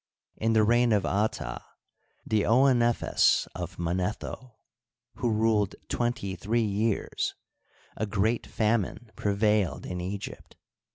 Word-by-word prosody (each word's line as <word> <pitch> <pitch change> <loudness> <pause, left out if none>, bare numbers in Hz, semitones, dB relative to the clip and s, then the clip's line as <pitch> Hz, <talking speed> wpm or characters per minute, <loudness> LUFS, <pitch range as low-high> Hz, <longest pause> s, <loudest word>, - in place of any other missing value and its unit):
In 115 +1 0
the 110 -1 +5
reign 120 +1 +4
of 100 -2 +2
Ata, 100 - -1 0.6
the 110 -1 +2
Ouenephes 120 +1 +3
of - - -6
Manetho, 95 +7 -3 0.6
who 120 - 0
ruled 110 -2 +2
twenty 120 -6 -1
three 110 +6 0
years, 105 +1 -1 0.6
a 110 - -2
great 110 +3 0
famine 110 +1 -1
prevailed 105 -1 +1
in 90 -1 -4
Egypt. 95 +2 -6
110 Hz, 110 wpm, -28 LUFS, 100-115 Hz, 0.6 s, the